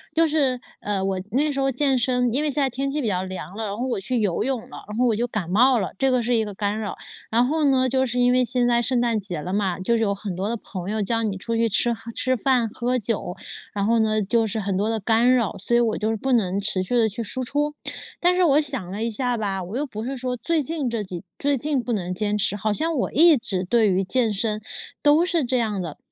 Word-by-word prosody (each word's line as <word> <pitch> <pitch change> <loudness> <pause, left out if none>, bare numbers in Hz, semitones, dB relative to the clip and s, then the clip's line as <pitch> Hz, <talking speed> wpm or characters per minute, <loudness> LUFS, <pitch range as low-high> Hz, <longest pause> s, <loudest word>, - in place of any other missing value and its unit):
就 330 0 +4
是， 275 -5 +1 0.2
呃， 200 -2 -2
我 190 -1 -1
那 290 +5 +2
时 275 - -3
候 270 0 +1
健 270 +1 +2
身 250 0 +1
因 285 +4 +1
为 300 - +1
现 290 - 0
在 270 - +2
天 275 +3 -3
气 295 +1 -1
比 235 - -2
较 185 -2 0
凉 185 +1 -7
了， 220 - -3
然 200 -1 -4
后 250 - -2
我 240 - -1
去 240 +4 -2
游 200 -5 0
泳 260 -1 -1
了， - - -10
然 210 - -5
后 250 - +3
我 225 - +2
就 235 +3 0
感 200 -7 -4
冒 245 +5 +4
了， 190 - -3
这 270 +4 +2
个 250 -1 +2
是 240 +1 +1
一 220 -1 +1
个 205 - -6
干 205 +2 -2
扰。 210 -2 -4 0.4
然 240 +2 +4
后 310 +3 0
呢， 260 -1 +2
就 260 +1 +1
是 250 0 -2
因 245 0 +4
为 250 0 +3
现 245 0 +1
在 235 -1 +3
圣 245 0 0
诞 235 -2 +1
节 185 -5 -4
了 180 +5 -5
嘛， 190 -3 -1
就 230 +5 +1
是 225 - +1
有 200 - +1
很 200 -2 -5
多 190 +2 -2
的 230 - -1
朋 190 -1 -6
友 215 0 -1
叫 230 +3 0
你 205 -3 -1
出 230 +5 -3
去 230 0 +2
吃 235 +3 +3
喝 230 +1 -8
吃 255 +2 0
饭、 245 -1 +2
喝 250 +3 -1
酒， 210 -5 -3 0.4
然 200 - -1
后 230 +1 +3
呢， 215 -1 +2
就 225 +3 +1
是 220 +1 -2
很 195 -2 -2
多 205 +3 0
的 225 0 -1
干 230 +4 +3
扰， 235 -6 +1
所 205 +5 0
以 240 - +5
我 230 -2 +1
就 215 +1 -1
是 225 - -1
不 265 +5 -2
能 200 -5 +2
持 195 -2 +2
续 245 +7 -2
地 225 -2 +3
去 230 +3 -5
输 255 +5 -2
出。 295 +4 -1 0.5
但 355 +1 +4
是 365 - +3
我 300 -2 +4
想 265 - +3
了 205 +3 -3
一 230 - 0
下 245 +2 -1
吧， 195 -4 -2
我 185 +5 -7
又 285 - -1
不 220 -5 -7
是 270 +3 -4
说 250 -1 -3
最 330 +4 0
近 300 -2 -2
这 230 -3 -2
几 185 -2 -7 0.2
最 285 -1 +1
近 285 0 -1
不 245 - -4
能 180 -5 -2
坚 210 +2 0
持， 205 - +2
好 210 +1 -1
像 320 +8 0
我 250 - -1
一 325 +2 +6
直， 200 -7 -1
对 220 +2 +3
于 190 +1 +1
健 230 +3 +2
身 215 +1 -1 0.4
都 295 +4 +4
是 340 -5 0
这 255 +1 0
样 215 -5 -1
的。 165 -4 -6
230 Hz, 305 characters per minute, -23 LUFS, 205-255 Hz, 0.5 s, 一